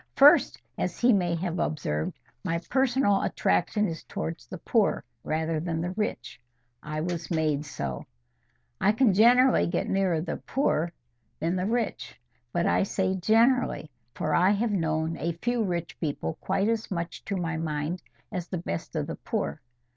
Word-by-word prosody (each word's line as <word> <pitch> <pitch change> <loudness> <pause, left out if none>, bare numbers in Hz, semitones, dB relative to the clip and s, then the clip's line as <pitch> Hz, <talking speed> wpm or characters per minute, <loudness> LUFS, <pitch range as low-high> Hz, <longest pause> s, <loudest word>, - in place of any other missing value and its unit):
First, 285 +2 +6 0.2
as - - -2
he 240 0 +5
may 175 -4 +2
have 175 0 -2
observed, 130 - -2 0.3
my 165 - 0
personal 260 -6 +3
attraction 205 - +1
is 165 -1 -5
towards 165 0 -5
the 185 - -7
poor 205 - +1 0.2
rather 160 0 -1
than 165 0 -2
the 175 +2 -2
rich. 200 - -4 0.4
I 155 +1 -4
was 170 -1 -3
made 155 -3 0
so. 70 - -5 0.7
I 205 +2 +4
can 225 -2 +4
generally 245 +5 +5
get 170 - -1
nearer 190 -4 +1
the 160 - -3
poor 170 - 0 0.5
than 170 +3 0
the 185 +1 0
rich. 230 0 -2 0.3
But 170 +4 0
I - - +3
say 190 -1 0
GENERALLY, 225 - +2 0.2
for 155 - -1
I 180 +2 +5
have 210 +3 +1
known 160 -3 0
a 170 +3 -1
few 235 +7 -1
rich 175 -4 -3
people 140 - -2
quite 195 +2 +1
as 225 -1 -1
much 170 -2 -4
to 200 - -2
my 165 -3 -2
mind 160 +2 -2 0.3
as 180 -2 -4
the 185 - -3
best 85 - -5
of - - 0
the - - -6
poor. 70 +1 -3
175 Hz, 165 wpm, -27 LUFS, 160-210 Hz, 0.7 s, First